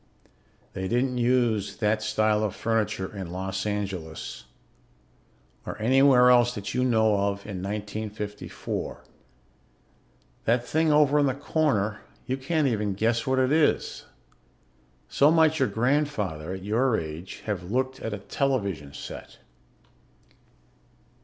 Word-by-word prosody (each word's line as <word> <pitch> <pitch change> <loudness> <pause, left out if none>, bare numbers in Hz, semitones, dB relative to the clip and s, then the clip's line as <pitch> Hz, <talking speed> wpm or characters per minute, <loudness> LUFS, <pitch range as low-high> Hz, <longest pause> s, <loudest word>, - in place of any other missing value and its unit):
They 95 0 -3
didn't 125 +3 0
use 120 -5 +1
that 105 0 +1
style 110 0 +1
of 105 - -2
furniture 110 -3 -1
in 95 -3 -5
Los 95 +2 -3
Angeles 95 -6 -4 1.2
or - - -7
anywhere 125 +1 +5
else 120 0 +4
that 100 -1 -5
you 125 - +1
know 110 -4 +3
of 100 0 -1
in 100 -4 -5
1954. 105 +1 -5 1.4
That 120 +1 +2
thing 160 +3 +2
over 150 -1 +4
in 145 - +3
the 130 - 0
corner 135 -9 0 0.3
you 130 - -1
can't 145 +3 0
even 105 -5 -1
guess 115 +4 0
what 130 0 +2
it 130 0 +2
is. 155 0 +1 1.0
So 145 - +4
might 160 -1 +4
your 130 - +3
grandfather, 110 - -1
at 95 -1 -7
your 115 +3 +2
age, 80 +3 -7
have 95 -4 -3
looked 130 +3 -1
at 110 - -4
a 105 - -3
television 100 - -2
set. - - -9
110 Hz, 125 wpm, -26 LUFS, 100-130 Hz, 1.4 s, anywhere